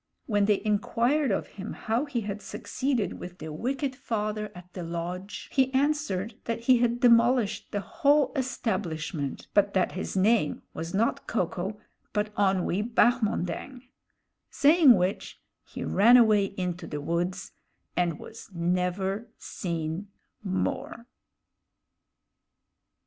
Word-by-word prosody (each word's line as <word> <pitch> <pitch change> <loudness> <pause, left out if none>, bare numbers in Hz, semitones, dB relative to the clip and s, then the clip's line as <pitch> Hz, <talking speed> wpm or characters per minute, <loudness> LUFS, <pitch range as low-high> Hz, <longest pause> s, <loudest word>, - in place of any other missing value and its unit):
When 205 -3 +2
they 205 -1 +2
inquired 240 +7 +1
of 195 - 0 0.2
him 200 - -5
how 230 +6 -1
he 270 -5 -2
had 210 0 -5
succeeded 255 -6 -2
with 180 0 -8
the 155 -3 -7
wicked 265 - -2
father 215 -4 -3
at 180 0 -13
the 185 - -6
lodge, 175 +3 -5
he 265 -1 +2
answered 275 -8 0
that 230 0 -2
he 250 +1 +5
had 240 0 +1
demolished 235 -2 +4
the 205 - -1
whole 290 - +2
establishment, 180 - -2
but 200 -1 +3
that 190 - +2
his 190 +1 -4
name 205 -4 +2
was 165 +3 -5
not 225 +4 0
Ko 215 -5 +1
ko, 185 +5 -5 0.3
but 210 0 -1
Onwee 190 -1 +1
Bahmondang; 240 0 0 0.7
saying 295 -3 +6
which, 185 +1 -2 0.2
he - - -7
ran 235 +5 +6
away 215 -4 +5
into 180 -3 -4
the 150 - -4
woods, 175 +5 -2 0.4
and 175 -3 +1
was 225 - -11
never 180 +5 -1
seen 170 +2 -4 0.4
more. 235 - -2
210 Hz, 125 wpm, -27 LUFS, 180-240 Hz, 0.7 s, saying